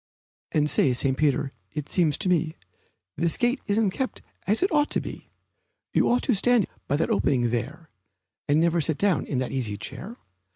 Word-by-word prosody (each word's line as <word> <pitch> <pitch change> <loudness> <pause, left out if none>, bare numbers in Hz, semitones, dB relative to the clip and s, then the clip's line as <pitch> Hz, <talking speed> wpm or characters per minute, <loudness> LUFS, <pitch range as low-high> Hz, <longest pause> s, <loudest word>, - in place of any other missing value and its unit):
And 150 -1 +2
say, 135 -3 +3
St. 130 +2 +1
Peter, 140 -1 +1 0.2
it 150 -1 -4
seems 160 -6 +2
to 205 - -2
me 165 -3 +1 0.6
This 165 +1 +1
gate 245 +2 +1
isn't 205 -1 +2
kept 260 +7 -4 0.2
as 210 - +2
it 380 - +1
ought 295 -1 +3
to - - 0
be; - - -8 0.6
You - - +3
ought 245 +1 +2
to 255 - +2
stand 230 0 +3 0.2
by 145 - +1
that 160 - 0
opening 120 -4 +2
there, 135 +8 -4 0.6
And 145 +2 +3
never 170 0 +2
sit 155 -1 +1
down 195 -9 +1
in 135 - -2
that 130 0 -1
easy 115 -6 -2
chair. 210 - -7
160 Hz, 190 wpm, -25 LUFS, 140-205 Hz, 0.6 s, say